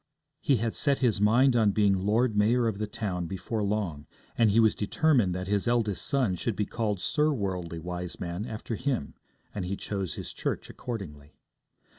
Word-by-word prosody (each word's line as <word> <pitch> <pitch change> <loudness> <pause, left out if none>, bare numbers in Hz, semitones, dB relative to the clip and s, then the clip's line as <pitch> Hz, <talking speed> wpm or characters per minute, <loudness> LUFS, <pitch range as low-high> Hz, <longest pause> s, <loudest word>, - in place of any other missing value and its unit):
He 140 - +2
had 115 -1 -1
set 140 -1 +1
his 120 -6 +1
mind 120 +5 +5
on 110 -4 +4
being 100 -1 +4
Lord 115 +1 +2
Mayor 115 +3 +3
of 105 -3 -2
the 105 - -1
town 100 -5 -3
before 100 +5 -3
long, 100 -8 -2 0.3
and 115 -2 +4
he 105 +3 +4
was 110 -2 +5
determined 120 - +2
that 90 0 -3
his 100 +3 0
eldest 115 -5 +1
son 135 -9 +1
should 100 +5 -2
be 105 - 0
called 105 -4 -2
Sir 150 - +2
Worldly 95 - -3
Wiseman 90 +3 -4
after 110 +1 -5
him, 125 - -2 0.4
and 100 - -3
he 95 +2 -3
chose 100 -4 -3
his - - -6
church - - -3
accordingly. 75 - -7
105 Hz, 180 wpm, -28 LUFS, 95-120 Hz, 0.4 s, mind